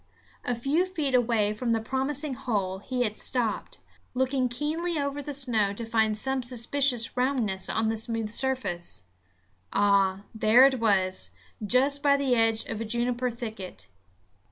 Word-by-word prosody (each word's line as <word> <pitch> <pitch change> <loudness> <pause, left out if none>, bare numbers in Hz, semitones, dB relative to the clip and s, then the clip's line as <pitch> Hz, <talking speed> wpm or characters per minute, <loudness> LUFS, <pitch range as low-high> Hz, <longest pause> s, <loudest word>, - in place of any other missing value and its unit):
A 245 - -1
few 285 +10 0
feet 310 -8 -2
away 225 -4 +2
from 230 +2 -1
the 225 - +1
promising 265 +5 -1
hole 200 -7 -2
he 250 +4 -2
had 215 -2 -3
stopped, 235 -5 -1 0.3
looking 260 0 +1
keenly 315 +7 -2
over 280 0 -2
the 290 - -6
snow 235 -8 +1
to 230 +3 -6
find 220 -1 +1
some 265 +3 0
suspicious 245 0 0
roundness 250 -7 0
on 220 0 0
the 225 - -1
smooth 225 -1 -2
surface. 210 - -1 0.7
Ah! 200 -1 +2
there 220 +4 +6
it 265 -2 +2
was, 190 - +1 0.3
just 270 +6 +3
by 280 -1 +4
the 275 -2 +1
edge 225 -2 +2
of 220 - -5
a - - -3
juniper 240 +2 0
thicket. 215 - -8
240 Hz, 155 wpm, -27 LUFS, 215-265 Hz, 0.7 s, there